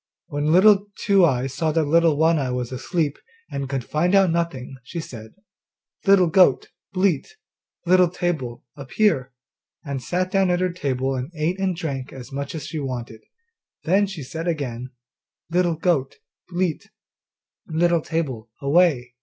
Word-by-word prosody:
When 145 +1 0
Little 200 +3 +6
Two 200 -2 +3
eyes 130 -3 0
saw 160 +3 0
that 165 0 +2
Little 165 0 +3
One 160 +1 +3
eye 135 -2 -1
was 125 -1 -3
asleep 145 +3 -2 0.3
and 140 -1 -4
could 135 -2 -2
find 175 +9 +1
out 195 -3 +5
nothing, 145 -6 -3
she 170 +7 -6
said, 110 -8 -9 0.7
'Little 195 -2 +6
goat, 170 -4 +4 0.2
bleat, 185 - 0 0.5
Little 180 0 +5
table, 160 -9 -3
appear,' 140 -1 0 0.5
and 140 -2 -4
sat 185 +6 -2
down 195 -2 +2
at 175 0 +2
her 185 -1 0
table 135 -5 -1
and 130 +2 -4
ate 165 +5 -1
and 190 -2 0
drank 140 -6 -4
as 130 -1 -10
much 140 +3 -4
as 155 -3 -5
she 155 - -5
wanted. 125 -5 -5 0.6
Then 195 +5 +3
she 185 -7 -7
said 160 +6 -6
again, 130 -7 -3 0.6
'Little 175 -1 +2
goat, 155 -5 0 0.3
bleat, 175 -3 -2 0.8
Little 170 +1 +2
table, 135 -9 -3
away. 140 -5 +2
160 Hz, 155 wpm, -23 LUFS, 135-180 Hz, 0.8 s, Little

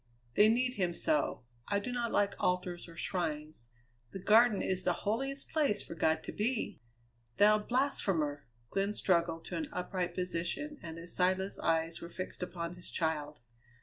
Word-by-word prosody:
They 210 - +6
need 250 +2 +2
him 175 -3 0
so. 305 - +1 0.2
I 200 - +1
do 200 +5 -3
not 240 -1 -1
like 200 0 +2
altars 180 -1 0
or 165 -1 -13
shrines; 155 -9 -3 0.4
the - - -7
Garden 215 +2 +5
is 185 -1 0
the 180 - +3
holiest 270 +6 -1
place 285 -10 +1
for - - -7
God 160 0 +1
to - - -5
be!" 220 - -1 0.6
"Thou 215 +1 +6
blasphemer!" 195 - 0 0.2
Glenn 195 +1 +1
struggled 170 -4 +1
to - - -4
an 310 -2 -3
upright 180 -5 -2
position 180 - -2
and 165 -1 -7
his 170 +1 -6
sightless 185 +2 +1
eyes 165 0 0
were 170 - -7
fixed 185 +1 -6
upon 175 -1 -4
his 175 0 -6
child. 150 -4 -2
185 Hz, 165 wpm, -33 LUFS, 170-215 Hz, 0.6 s, They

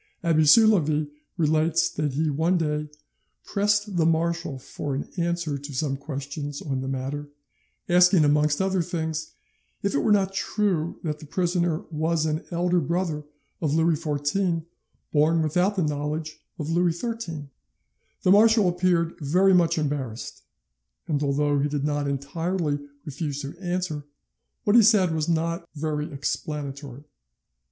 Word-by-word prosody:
Abbe 160 -2 +3
Soulavie 155 -6 +5 0.3
relates 160 0 +2
that 150 -2 -2
he 155 +2 0
one 165 +5 +2
day 150 -2 -1 0.6
"pressed 205 -1 0
the 165 - +3
marshal 165 -2 0
for 135 +1 -5
an 140 - -4
answer 170 -4 -1
to 145 +1 -8
some 135 +1 0
questions 140 0 -5
on 135 -3 -3
the 130 - -4
matter, 135 +2 -4 0.6
asking, 180 -2 +5
amongst 150 0 +3
other 190 -1 +1
things, 160 -2 -3 0.5
if 200 - 0
it 140 - +2
were 215 - +1
not 195 -2 +3
true 190 -4 -1
that 150 -2 -3
the 155 - -11
prisoner 175 -1 0
was 160 +1 0
an 155 +1 -1
elder 175 +1 +1
brother 165 -1 -2 0.4
of 155 -2 +1
Louis 165 +1 +3
XIV 160 +3 -1 0.5
born 160 +2 +3
without 180 +6 +1
the 185 - +1
knowledge 150 +1 -3 0.2
of 155 0 -3
Louis 170 0 +1
XIII. 180 - -5 0.7
The 185 - +4
marshal 215 0 +6
appeared 175 -2 +1
very 180 +6 +3
much 170 -2 +3
embarrassed, 140 -7 -3 0.7
and 145 -3 0
although 145 0 +1
he 145 +1 +1
did 145 -1 -2
not 145 -1 0
entirely 150 +3 -2 0.3
refuse 145 0 -4
to 140 +4 -6
answer, 175 -5 -3 0.6
what 205 - +3
he 240 - +9
said 200 -6 +4
was 160 +1 -1
not 170 +1 -1
very 150 +1 -2
explanatory. 140 -1 -4
160 Hz, 145 wpm, -25 LUFS, 145-175 Hz, 0.7 s, he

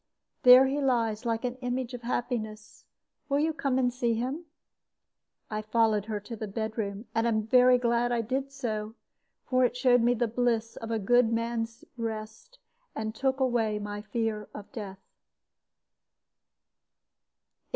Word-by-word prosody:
There 250 +1 +9
he 275 +2 -1
lies, 235 -4 0
like 230 +1 -1
an 250 0 -3
image 250 0 -3
of 245 - -6
happiness. 225 -3 -4 0.4
Will 280 - +2
you 315 +2 +1
come 275 -4 -1
and 245 -2 +1
see 240 -2 0
him?" 265 +9 -3 1.0
I 215 0 -3
followed 215 -1 +2
her 215 -1 -3
to 230 +3 -7
the 215 0 -5
bedroom, 220 0 -4
and 225 +1 +1
am 220 -2 +1
very 250 +2 +6
glad 235 -1 +1
that 240 - +1
I 230 - +1
did 265 +4 -3
so; 220 -5 -4 0.5
for 255 0 +2
it 250 0 +1
showed 250 -1 +4
me 240 +1 +3
the 240 0 0
bliss 230 -1 0
of 225 - -7
a 225 - 0
good 230 +3 +3
man's 230 0 -2
rest, 225 - -6 0.4
and 220 0 -3
took 265 +3 0
away 235 -5 +1
my 205 0 -5
fear 215 0 -3
of 205 - -9
death. 200 -4 -7
230 Hz, 155 wpm, -28 LUFS, 220-250 Hz, 1.0 s, There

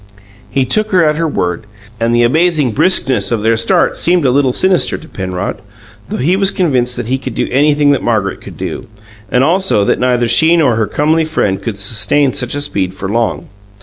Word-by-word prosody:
He 135 -1 0
took 215 +9 0
her 180 -5 +3
at 150 0 +1
her 165 0 0
word, 90 - -3 0.3
and 115 0 0
the 120 - +3
amazing 155 +1 +1
briskness 130 - +1
of 110 -3 -1
their 115 +1 +2
start 115 +1 +1
seemed 175 -3 +1
a 130 - +3
little 135 0 +2
sinister 185 +7 +1
to 160 - -14
Penrod, 95 - -5 0.5
though - - -4
he 170 +9 +1
was 195 0 +2
convinced 125 -11 0
that 120 - -4
he 130 +3 -2
could 130 -3 -7
do - - -1
anything 145 +1 +2
that 140 - 0
Margaret 105 -4 -1
could - - -12
do, - - -6 0.4
and 125 - +2
also 170 - +1
that - - 0
neither 125 -1 +1
she 165 +7 +4
nor 140 -8 +2
her 110 -1 -1
comely 155 +8 +1
friend 105 -12 -1
could 100 0 -5
sustain 115 +7 +1
such 125 -1 -2
a 145 - -3
speed 95 -9 -3
for 95 - -5
long. 115 -1 -2
130 Hz, 210 wpm, -13 LUFS, 110-155 Hz, 0.5 s, she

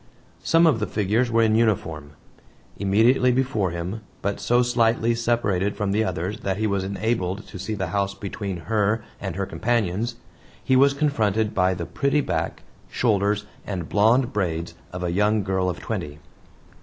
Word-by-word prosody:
Some 165 +1 +4
of 150 -9 +4
the 105 - -1
figures 110 +4 +1
were 115 0 +3
in 110 -1 +3
uniform. 80 -10 0 0.7
Immediately 115 +6 +4
before 125 -6 +1
him, 85 +6 -4 0.2
but 100 0 -1
so 120 +4 +3
slightly 115 -1 +2
separated 115 -5 0
from 105 -2 -1
the 105 +2 +2
others 95 +1 -3
that 95 -1 -2
he 110 - 0
was 100 -2 0
enabled 100 0 -2
to 95 - -10
see 110 +4 -3
the 95 -4 -3
house 100 -1 0
between 100 -2 -5
her 105 +3 0 0.2
and 95 -4 -4
her 100 0 -1
companions, 115 +1 -1 0.5
he 130 - +2
was 140 +2 +5
confronted 110 -7 +1
by 95 -2 +2
the 85 -1 -4
pretty 140 - 0
back, - - -3 0.3
shoulders, 105 -2 +1 0.2
and 90 -5 -5
blond 120 +5 +3
braids 85 -4 -2 0.2
of 90 0 -5
a 85 - -1
young 105 +3 +2
girl 95 -1 0
of 90 - -4
twenty. 75 0 -4
105 Hz, 170 wpm, -24 LUFS, 95-115 Hz, 0.7 s, was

